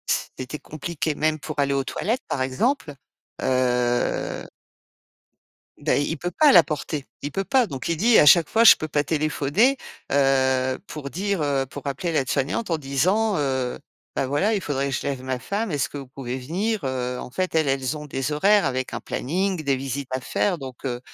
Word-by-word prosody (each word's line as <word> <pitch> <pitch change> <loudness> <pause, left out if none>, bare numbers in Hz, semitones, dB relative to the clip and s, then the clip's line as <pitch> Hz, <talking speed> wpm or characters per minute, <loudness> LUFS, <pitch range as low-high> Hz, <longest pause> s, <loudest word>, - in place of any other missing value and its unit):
c - - -2 0.2
c'était 130 +4 -5
compliqué, 155 0 -4
même 155 0 0
pour 155 0 -7
aller 140 0 +2
aux 135 - +1
toilettes, 235 +5 -2
par 130 - -1
exemple, 155 - -1 0.5
heu 125 -1 0 1.3
bah, - - +1
i 145 - +1
il 165 - -3
peut 175 - -3
pas 295 - +5
la 175 -3 +9
porter, 150 -1 -4 0.2
il 145 - -4
peut 195 - -1
pas 260 +1 +3
donc 135 -4 -5
il 165 - 0
dit 225 +6 +5
à 150 - +5
chaque 170 0 +7
fois: 225 - +3
«Je - - +10
peux 155 - -4
pas 145 0 +1
téléphoner, 155 - +1 0.4
heu, 130 -2 +2
pour 140 -3 -7
dire, 195 -2 -1
heu, 140 -2 0
pour 145 +2 -9
appeler 165 +5 -2
l'aide-soignante 145 - -1
en 165 - +1
disant, 185 +10 +1
heu, 130 -3 -1 0.4
bah, 135 - 0
voilà, 195 +11 +1
il 200 - 0
faudrait 140 -3 -2
je - - -1
lève 135 -2 -3
ma 130 -1 -2
femme, 205 -1 -2
est-ce 140 -1 0
que 145 - -7
vous 135 - -8
pouvez 130 -1 -6
venir?», 185 - -2
heu, 125 -1 -2
en - - -7
fait, 185 +7 -2
elles 155 -2 +3
elles 135 +2 0
ont 150 0 -7
des 135 0 -3
horaires 195 +7 +4
avec 130 -1 -2
un - - -3
planning, 180 +3 -2
des 140 -1 +2
visites 135 0 -4
à 130 - -1
faire, 180 +7 0
donc 130 -2 -9
heu 120 -2 -2
145 Hz, 200 wpm, -24 LUFS, 130-175 Hz, 1.3 s, Je